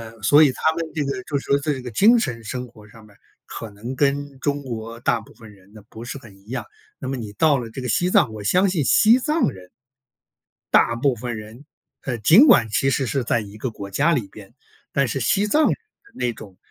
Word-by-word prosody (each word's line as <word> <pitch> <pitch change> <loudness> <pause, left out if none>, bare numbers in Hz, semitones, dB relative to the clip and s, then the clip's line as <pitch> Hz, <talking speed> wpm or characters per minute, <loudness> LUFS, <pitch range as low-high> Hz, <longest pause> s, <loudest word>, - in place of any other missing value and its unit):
呃， 110 - -20
所 145 +7 +6
以 145 - +4
他 160 - +1
们 165 0 -3
这 150 - 0
个 160 +8 -4
就 145 - -2
说 140 - 0
在 150 +1 -2
这 135 - -6
个 125 -1 -7
精 220 - +5
神 125 - -3
生 125 +3 -5
活 105 -3 -17
上 110 +1 -16
面， 105 -1 -20 0.3
可 115 - -8
能 115 +6 -7
跟 140 0 -1
中 145 0 -2
国 115 -2 -7
大 120 -2 +1
部 - - -17
分 110 -3 -14
人 100 0 -22
呢， 105 -2 -14
不 115 - -10
是 120 +3 -6
很 110 -7 -15
一 100 - -25
样。 120 -3 -5 0.3
那 130 - -6
么 135 - -2
你 110 -4 -7
到 145 +5 +3
了 115 -2 -6
这 110 - -8
个 125 - -4
西 175 - +1
藏， 110 -10 +3
我 105 - -8
相 185 - +3
信 165 -6 0
西 230 +4 +5
藏 305 - +1
人 90 -4 -14 1.0
大 115 - +4
部 130 +1 +1
分 120 0 -5
人， 110 +6 -11 0.4
呃， 125 -5 -3
尽 190 - +7
管 115 - +6
其 135 +6 +1
实 135 0 0
是 130 +1 -1
在 115 - +1
一 105 0 -11
个 125 +3 -3
国 100 -2 -9
家 150 +11 +2
里 120 -9 -1
边， 100 +1 -14 0.4
但 140 - +2
是 135 - -3
西 195 - +1
藏 300 +9 +2
人 - - +2
的 435 -2 -29
那 125 - -1
种， 100 -4 -13
125 Hz, 260 characters per minute, -22 LUFS, 110-145 Hz, 1.0 s, 尽